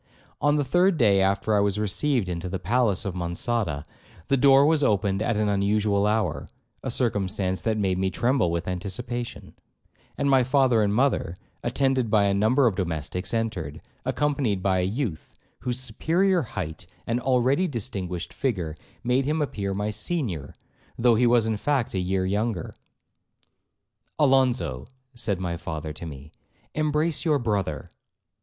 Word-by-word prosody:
On 145 Hz, +1 st, +3 dB
the 145 Hz, -, +2 dB
third 175 Hz, +6 st, +3 dB
day 100 Hz, -7 st, +4 dB
after 100 Hz, +2 st, +1 dB
I -, -, +4 dB
was 100 Hz, 0 st, +1 dB
received 105 Hz, +2 st, 0 dB
into 90 Hz, 0 st, -4 dB
the 95 Hz, -, -2 dB
palace 105 Hz, +2 st, +1 dB
of 100 Hz, -, -2 dB
Monçada, 85 Hz, -2 st, -2 dB, 0.4 s
the 140 Hz, -, +4 dB
door 135 Hz, +1 st, +6 dB
was 155 Hz, -1 st, +3 dB
opened 100 Hz, -3 st, +1 dB
at 115 Hz, -1 st, 0 dB
an 105 Hz, 0 st, +1 dB
unusual 100 Hz, 0 st, +2 dB
hour, 100 Hz, -10 st, -1 dB, 0.3 s
(a 130 Hz, -, -4 dB
circumstance 100 Hz, -6 st, -1 dB
that 110 Hz, -1 st, 0 dB
made 95 Hz, -3 st, 0 dB
me 95 Hz, 0 st, +1 dB
tremble 120 Hz, +1 st, +1 dB
with 85 Hz, 0 st, -2 dB
anticipation), 110 Hz, +7 st, -4 dB, 0.6 s
and 140 Hz, -, 0 dB
my 135 Hz, -2 st, +5 dB
father 130 Hz, -2 st, +3 dB
and 105 Hz, -1 st, +2 dB
mother, 125 Hz, -9 st, +1 dB, 0.3 s
attended 130 Hz, -1 st, +1 dB
by 105 Hz, -1 st, +4 dB
a 100 Hz, -1 st, +2 dB
number 110 Hz, +7 st, +3 dB
of 115 Hz, -, +3 dB
domestics, 90 Hz, 0 st, -3 dB
entered, 110 Hz, -10 st, -2 dB, 0.2 s
accompanied 135 Hz, -10 st, 0 dB
by 95 Hz, -1 st, +2 dB
a 90 Hz, -, +1 dB
youth 105 Hz, -, -4 dB, 0.2 s
whose 125 Hz, 0 st, -2 dB
superior 170 Hz, -, +1 dB
height 85 Hz, -, -5 dB, 0.2 s
and 115 Hz, +1 st, 0 dB
already 130 Hz, +7 st, +2 dB
distinguished 95 Hz, -, -4 dB
figure, 90 Hz, -, -2 dB, 0.3 s
made 125 Hz, +2 st, +2 dB
him 155 Hz, +3 st, 0 dB
appear 105 Hz, -9 st, -2 dB
my 105 Hz, +2 st, -1 dB
senior, 105 Hz, -, -2 dB, 0.4 s
though 120 Hz, 0 st, +4 dB
he 120 Hz, +2 st, +3 dB
was 120 Hz, -2 st, +4 dB
in 110 Hz, -1 st, 0 dB
fact 135 Hz, 0 st, 0 dB
a 95 Hz, -, 0 dB
year 95 Hz, +1 st, 0 dB
younger. 100 Hz, -2 st, -1 dB, 1.4 s
'Alonzo,' 130 Hz, -, +2 dB, 0.3 s
said 110 Hz, -6 st, -2 dB
my 85 Hz, -2 st, -3 dB
father 80 Hz, -2 st, -5 dB
to 85 Hz, +2 st, -7 dB
me, 75 Hz, 0 st, -10 dB, 0.4 s
'embrace 155 Hz, +1 st, 0 dB
your 155 Hz, -3 st, +3 dB
brother.' 100 Hz, -, -2 dB
110 Hz, 155 wpm, -25 LUFS, 95-130 Hz, 1.4 s, door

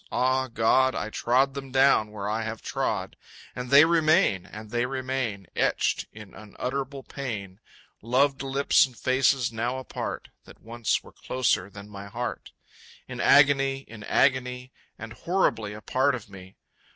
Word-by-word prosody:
(Ah, 130 Hz, +1 st, +1 dB
God, 130 Hz, +3 st, +2 dB
I 110 Hz, -, -3 dB
trod 130 Hz, +5 st, +2 dB
them 135 Hz, -1 st, -7 dB
down 130 Hz, -5 st, +4 dB
where 105 Hz, -1 st, -6 dB
I 110 Hz, +2 st, -1 dB
have 110 Hz, 0 st, -5 dB
trod, -, -, -2 dB, 0.4 s
And 125 Hz, 0 st, -5 dB
they 140 Hz, +3 st, +8 dB
remain, 155 Hz, -, +3 dB
and 110 Hz, +1 st, -10 dB
they 120 Hz, +1 st, 0 dB
remain, 130 Hz, -6 st, -3 dB
Etched -, -, 0 dB
in 105 Hz, -2 st, -12 dB
unutterable 135 Hz, +5 st, -5 dB
pain, 105 Hz, -10 st, -6 dB, 0.4 s
Loved 135 Hz, +4 st, +1 dB
lips 135 Hz, 0 st, +3 dB
and 125 Hz, -3 st, -18 dB
faces 130 Hz, -1 st, +2 dB
now 120 Hz, +3 st, -2 dB
apart, 130 Hz, -, -6 dB, 0.2 s
That -, -, -15 dB
once 115 Hz, 0 st, -2 dB
were -, -, -15 dB
closer 105 Hz, -7 st, -1 dB
than 100 Hz, 0 st, -11 dB
my 100 Hz, -1 st, -9 dB
heart 120 Hz, +4 st, -5 dB, 0.6 s
In -, -, -7 dB
agony, 135 Hz, -1 st, +4 dB
in 110 Hz, -2 st, -11 dB
agony, 125 Hz, -1 st, +1 dB, 0.3 s
And 115 Hz, +1 st, -8 dB
horribly 115 Hz, -, 0 dB
a 105 Hz, -, -9 dB
part 130 Hz, +5 st, +1 dB
of 105 Hz, -5 st, -10 dB
me.... 95 Hz, -1 st, -12 dB
125 Hz, 150 wpm, -26 LUFS, 110-135 Hz, 0.6 s, they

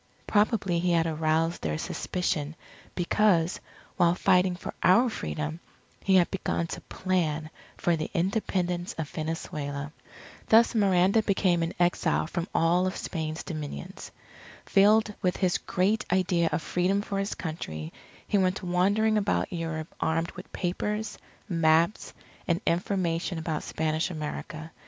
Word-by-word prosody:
Probably 205 Hz, -4 st, +2 dB
he 175 Hz, 0 st, +1 dB
had 165 Hz, -1 st, +3 dB
aroused 160 Hz, +1 st, 0 dB
their 75 Hz, -1 st, -1 dB
suspicion 155 Hz, -, -2 dB, 0.4 s
because, 180 Hz, -2 st, +2 dB, 0.4 s
while 170 Hz, 0 st, +4 dB
fighting 180 Hz, 0 st, +3 dB
for -, -, -7 dB
our 230 Hz, +7 st, +5 dB
Freedom, 155 Hz, -4 st, -4 dB, 0.4 s
he 195 Hz, -, +3 dB
had 180 Hz, -2 st, +4 dB
begun 185 Hz, -3 st, -1 dB
to -, -, -6 dB
plan 160 Hz, -4 st, -1 dB, 0.3 s
for 175 Hz, -, +2 dB
the 155 Hz, -1 st, -3 dB
Independence 180 Hz, -1 st, -1 dB
of 160 Hz, -2 st, -3 dB
Venezuela. 150 Hz, -2 st, -4 dB, 0.6 s
Thus 230 Hz, +2 st, +6 dB
Miranda 195 Hz, -1 st, +4 dB
became 190 Hz, -4 st, +2 dB
an 165 Hz, +1 st, -2 dB
exile 175 Hz, -3 st, +2 dB
from 170 Hz, +2 st, -3 dB
all 175 Hz, +3 st, +3 dB
of 185 Hz, -, -3 dB
Spain's 160 Hz, -2 st, -4 dB
dominions. 150 Hz, -, -6 dB, 0.6 s
Filled 210 Hz, +2 st, +4 dB
with 180 Hz, -1 st, +1 dB
his 185 Hz, -2 st, +1 dB
great 200 Hz, +4 st, +1 dB
idea 180 Hz, -2 st, +2 dB
of 165 Hz, -, -1 dB
Freedom 190 Hz, +3 st, +1 dB
for 200 Hz, -2 st, -3 dB
his 195 Hz, +1 st, -2 dB
Country, 80 Hz, -, -5 dB, 0.3 s
he 205 Hz, -, +2 dB
went 185 Hz, +1 st, +1 dB
wandering 200 Hz, +5 st, +2 dB
about 200 Hz, -2 st, 0 dB
Europe 165 Hz, -2 st, -4 dB
armed 165 Hz, +1 st, 0 dB
with -, -, -11 dB
papers, 210 Hz, +4 st, -3 dB, 0.3 s
maps, 165 Hz, +1 st, +2 dB, 0.4 s
and 170 Hz, 0 st, +2 dB
information 175 Hz, -1 st, 0 dB
about 160 Hz, -1 st, -2 dB
Spanish 155 Hz, 0 st, -1 dB
America. 155 Hz, 0 st, -6 dB
175 Hz, 135 wpm, -28 LUFS, 160-190 Hz, 0.6 s, Thus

